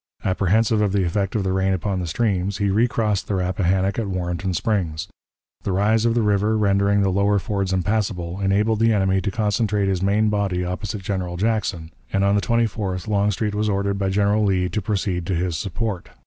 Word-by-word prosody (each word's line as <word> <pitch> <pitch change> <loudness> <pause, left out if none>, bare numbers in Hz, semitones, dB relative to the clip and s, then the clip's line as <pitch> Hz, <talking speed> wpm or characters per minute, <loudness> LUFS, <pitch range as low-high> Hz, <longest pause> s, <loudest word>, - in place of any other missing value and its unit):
Apprehensive 105 +4 +2
of 100 -2 +1
the 100 -2 +2
effect 95 +4 -1
of 105 - +1
the 95 -1 0
rain 95 0 +1
upon 95 +1 -2
the 90 - -3
streams, 100 0 0
he 100 -2 0
recrossed 110 -2 +1
the 100 - -1
Rappahannock 95 +2 0
at 110 - -2
Warrenton 90 0 -2
Springs. 90 -4 -1 0.5
The - - -3
rise 110 +4 +2
of 115 0 +2
the 120 - +2
river, 105 +1 +2
rendering 100 0 +2
the 95 - +1
lower 100 +2 +2
fords 100 +1 -2
impassable, 95 -2 -1
enabled 105 +3 +1
the 115 0 +4
enemy 95 -2 +2
to 100 - -1
concentrate 105 -1 0
his 95 -2 0
main 105 +3 +2
body 100 -4 -1
opposite 95 +2 -4
General 90 -2 -3
Jackson, 95 -6 -1 0.2
and 95 0 +1
on 100 0 +3
the 100 - +2
24th 100 -3 -1
Longstreet 105 0 0
was 105 +1 0
ordered 100 0 -1
by 95 -1 0
General 100 +2 +2
Lee 95 -3 +1
to 105 - -2
proceed 95 -3 -2
to 95 - 0
his 85 0 -1
support. 100 +3 -3
100 Hz, 195 wpm, -22 LUFS, 95-105 Hz, 0.5 s, the